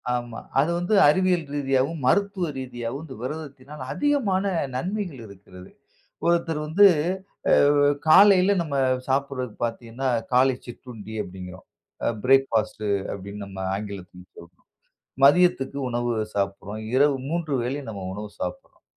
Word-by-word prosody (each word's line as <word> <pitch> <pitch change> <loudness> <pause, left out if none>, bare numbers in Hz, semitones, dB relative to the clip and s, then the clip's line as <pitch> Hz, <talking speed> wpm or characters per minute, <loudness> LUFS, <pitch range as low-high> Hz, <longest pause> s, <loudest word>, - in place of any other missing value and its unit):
ஆமா. 120 -2 -5 0.2
அது 145 +4 +3
வந்து 175 +5 -1
அறிவியல் 180 +1 +2
ரீதியாவும் 140 +2 0
,மருத்துவ 195 0 +1
ரீதியாவும் 125 +1 -5
இந்த 135 -4 -10
விரதத்தினால் 145 0 -7
அதிகமான 255 -11 +1 0.3
நன்மைகள் 180 - -3
இருக்கிறது. 95 -2 -14 0.6
ஒருத்தர் 170 -2 +1
வந்து 190 +7 +6 0.6
அ - - +5 0.5
காலையில 195 +3 +6
நாம 150 -4 -4 0.3
சாப்பிடுவது 135 -3 -1
பாத்தீங்கன்னா, 120 +3 -4 0.2
காலை 130 +1 +4
சிற்றுண்டி 120 -3 -10
அப்டீங்குறோம். 90 -1 -10 0.6
பிரேக்ஃபாஸ்ட் 115 -5 +2 0.3
அப்படின்னு 100 +1 -7
நம்ம 95 -1 -10 0.2
ஆங்கிலத்தில 95 -3 -7
சொல்றோம். 85 +1 -16 0.6
மதியத்திற்கு 145 -2 +4
உணவு 120 0 -1 0.2
சாப்பிடுகிறோம் 100 +1 -3
இரவு 140 +1 +4
3 165 -2 -2
வேளை 130 +4 -2
நாம் 100 -4 -6
உணவு 105 +1 -7
சாப்பிடுறோம். 90 0 -7
130 Hz, 115 wpm, -24 LUFS, 110-160 Hz, 0.6 s, வந்து